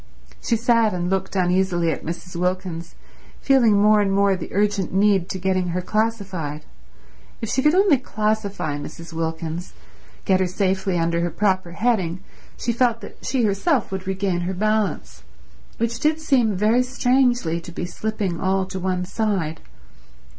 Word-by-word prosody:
She 230 - +1
sat 230 -3 +3
and 175 +1 -2
looked 190 0 -1
uneasily 180 -2 +2
at - - -5
Mrs. 175 +2 -6
Wilkins, 180 -1 -3 0.4
feeling 235 -7 +4
more 210 +1 +5
and 200 -1 +1
more 200 0 +3
the 185 - -7
urgent 205 -1 0
need 195 -2 +2
to - - -3
getting 185 -1 0
her 180 +1 -1
classified. 190 -9 -2 0.7
If 225 - -4
she 265 - +1
could 300 +4 +4
only 375 -8 +5
classify 210 -10 -2
Mrs. 165 +3 -9
Wilkins, 165 +1 -4 0.5
get 190 -1 +3
her 185 - +2
safely 190 0 0
under 170 0 +1
her 175 - 0
proper 185 0 0
heading, 190 -4 0 0.3
she 235 - -1
felt 235 -1 +1
that - - -12
she 260 -3 0
herself 215 - +1
would 190 0 -5
regain 190 -2 -1
her 180 +2 -3
balance, 205 - -1 0.6
which 230 0 -1
did 310 +1 +1
seem 250 -9 +2
very 215 +6 +3
strangely 250 -8 +1
to 175 - -10
be 175 - -4
slipping 195 -1 -3
all 190 0 +1
to 190 0 -6
one 180 0 -1
side. 190 -6 -1
190 Hz, 160 wpm, -22 LUFS, 175-220 Hz, 0.7 s, more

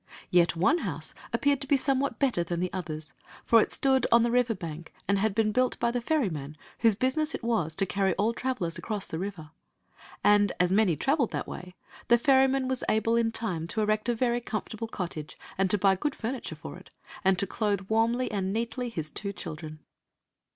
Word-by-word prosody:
Yet 175 -1 +4
one 285 - +3
house - - -4 0.2
appeared 285 -1 +1
to 275 - -5
be 280 - +4
somewhat 270 -2 0
better 255 -11 +1
than 170 0 -3
the 180 0 -2
others, 155 -4 -5 0.3
for 230 -1 +6
it - - -1
stood 265 -1 +2
on 235 0 +6
the 235 - +1
river 245 -2 +2
bank 165 -3 -7 0.2
and 200 0 +2
had 210 -1 +1
been 215 -1 +2
built 255 +3 +1
by 235 0 +1
the 245 0 -2
ferryman 170 - -1 0.2
whose 225 -3 +4
business 280 +7 0
it - - -7
was 215 -10 0
to 195 - +1
carry 195 -1 0
all 220 +3 +1
trav 260 +1 -2
elers 170 -5 -3
across 210 -3 -3
the 160 - -2
river. 180 -5 -6 0.7
And, 205 -1 +4
as 180 0 +3
many 195 -4 +3
traveled 270 - +1
that - - -3
way, 180 0 -8 0.3
the 240 - +6
ferryman 265 0 +3
was 260 -1 -1
able 225 +1 +2
in 230 -1 +2
time 185 -8 -3
to 220 +5 -1
erect 215 +2 +1
a 240 - +2
very 240 0 +1
comfortable 220 0 -4
cottage, 170 -8 -6 0.2
and 190 0 +1
to 210 - +4
buy 195 0 +4
good 295 +9 -2
furniture 245 +3 -4
for - - -9
it, - - -15 0.3
and 190 -1 +3
to 200 - +1
clothe 205 0 -1
yrarmly 230 +3 +2
and 195 -2 -1
neatly 235 +3 -2
his 160 -9 -5
two 200 -1 -4
children. 155 -4 -8
215 Hz, 205 wpm, -28 LUFS, 180-245 Hz, 0.7 s, for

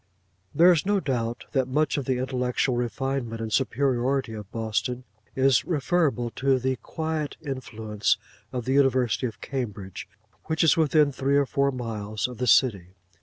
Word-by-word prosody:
There 175 +2 +7
is 165 -4 +2
no 205 +1 +2
doubt 120 -7 -2
that 130 -2 +1
much 150 +3 +1
of 140 - -2
the 130 -1 0
intellectual 125 0 0
refinement 120 -1 -2
and 110 -1 -4
superiority 130 -1 +1
of 105 -1 -8
Boston, 115 +3 -2 0.3
is 135 -1 +4
referable 145 -7 0
to 135 0 +3
the 130 +1 -1
quiet 160 -2 -4
influence 110 -6 -1 0.3
of 125 -2 -4
the 130 - 0
University 130 -3 +2
of 115 - -10
Cambridge, 105 -9 -5 0.4
which 160 +1 0
is 165 - +5
within 155 -2 +3
three 135 +1 +1
or 140 - +3
four 140 +1 +1
miles 110 -4 -3
of 125 -2 -10
the 125 - -1
city. 100 -7 +3
130 Hz, 160 wpm, -26 LUFS, 115-140 Hz, 0.4 s, There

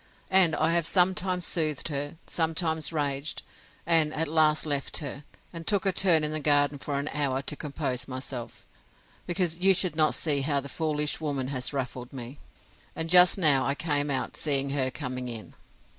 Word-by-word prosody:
And 185 -4 +5
I 160 +1 +1
have 170 -2 +1
sometimes 180 -1 +1
soothed 155 -2 0
her, 145 +1 -3
sometimes 160 -1 -1
raged; 145 -2 -2 0.4
and 165 -2 +4
at 160 +1 0
last 155 0 +3
left 145 -3 -2
her, 140 -1 -6 0.3
and 165 -1 -8
took 205 -2 +1
a 195 - +3
turn 175 -4 +4
in 150 - -1
the 155 - -2
garden 145 -1 +2
for 140 +1 -3
an 140 +1 -3
hour 135 -2 -1
to 150 - -3
compose 130 -4 -4
myself, 130 -2 -7 0.6
because 175 -1 0
you 190 +1 +4
should 180 -2 -1
not 155 -1 +2
see 145 -4 0
how 140 0 0
the 140 +1 -8
foolish 150 +1 -1
woman 140 -4 -2
has 130 -3 -2
ruffled 125 -3 -5
me; 130 +2 -8 0.6
and 160 0 -3
just 180 +1 +7
now 150 -7 +3
I 140 - 0
came 145 -2 -1
out, 130 -3 -2
seeing 140 -2 +1
her 135 -2 +1
coming 125 0 -5
in. 115 -2 -8
150 Hz, 180 wpm, -27 LUFS, 140-165 Hz, 0.6 s, just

